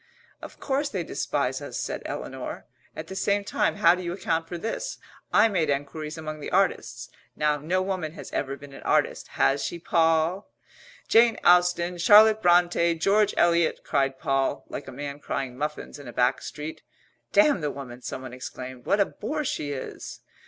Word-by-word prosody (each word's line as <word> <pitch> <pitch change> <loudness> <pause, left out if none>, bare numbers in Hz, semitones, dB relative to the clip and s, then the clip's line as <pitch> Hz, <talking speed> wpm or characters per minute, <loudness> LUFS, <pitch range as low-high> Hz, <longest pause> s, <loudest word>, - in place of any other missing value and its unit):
"Of - - -11
course 280 +1 -1
they - - -3
despise - - -2
us," - - -6
said - - -3
Eleanor. - - -6 0.3
"At - - -6
the 190 - -8
same 200 +1 +1
time 200 - 0
how 205 -4 +5
do 180 - -4
you 175 -1 -3
account 165 -3 -1
for 175 - -5
this 225 - -4 0.3
I 210 +2 +6
made 175 -8 0
enquiries 145 +3 -3
among 155 -1 -6
the 145 - -6
artists. - - 0 0.3
Now, 150 -1 +1
no 180 +6 0
woman 185 -5 -3
has - - -10
ever 140 0 -2
been 140 -1 -13
an - - -10
artist, - - +1
has 140 +1 +3
she, 175 - -3
Poll?" 165 +3 +1 0.6
"Jane 230 0 +5
Austen 175 0 +4
Charlotte 215 +4 +7
Brontë 175 -2 +3
George 205 +4 +3
Eliot," 170 -1 +3
cried 135 -1 0
Poll, 135 -2 0
like 140 - -6
a - - -7
man 145 +2 -6
crying 135 -3 -4
muffins 150 +2 -5
in 140 - -11
a 120 - -8
back 125 +1 +2
street. 155 +1 -7 0.5
"Damn 300 - +4
the 150 - -1
woman!" 130 -3 -8
someone 130 0 -6
exclaimed. 130 0 -8
"What 205 - +3
a 200 - +5
bore 300 +12 -4
she 145 - -2
is!" 135 -2 -7
165 Hz, 180 wpm, -26 LUFS, 140-190 Hz, 0.6 s, Charlotte